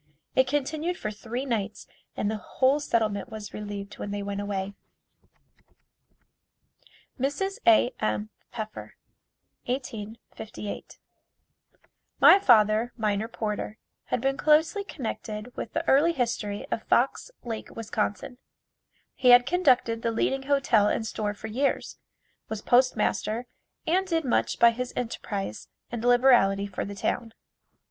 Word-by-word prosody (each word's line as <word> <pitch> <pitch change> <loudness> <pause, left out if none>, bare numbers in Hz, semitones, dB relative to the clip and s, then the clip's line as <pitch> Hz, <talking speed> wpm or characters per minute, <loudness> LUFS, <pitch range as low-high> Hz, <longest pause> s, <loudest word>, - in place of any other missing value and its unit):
It 260 - +4
continued 305 +5 -1
for 215 - -4
three 230 +5 -5
nights 220 -5 -3 0.3
and 210 - 0
the 220 - -2
whole 260 +7 +1
settlement 220 -7 0
was 215 -1 -8
relieved 205 -1 -6
when - - -4
they 205 0 -3
went 200 0 -3
away. 200 -1 -3 2.5
Mrs. 290 +9 -1
A. 325 -7 +6
M. 105 0 -1 0.2
Pfeffer 220 -2 -7 0.7
1858. 220 -4 -6 1.2
My 395 - +8
father, 215 - +4
Miner 215 -1 0
Porter 215 -2 -4 0.3
had 250 - -1
been 270 +1 0
closely 320 +6 +3
connected 225 - -6
with 225 - -6
the 325 0 -2
early 300 +6 +5
history 230 -6 -2
of 225 - -1
Fox 255 - +1
Lake, 225 -2 -5
Wis. 225 -2 -7 1.2
He 255 - +2
had 245 0 +8
conducted 255 -10 +2
the 230 - 0
leading 265 +4 0
hotel 245 -7 +4
and 220 - 0
store 210 -1 -3
for 215 - -10
years, 255 +6 -1 0.5
was 220 -1 -5
Postmaster, 245 -2 +2 0.4
and 370 +3 +1
did 325 -4 0
much 250 - +1
by 235 - +7
his 250 +1 -5
enterprise 200 - -4 0.2
and 235 -1 -4
liberality 245 -5 +4
for 200 -2 -4
the 200 - -7
town. 225 +3 -2
230 Hz, 125 wpm, -27 LUFS, 210-265 Hz, 2.5 s, My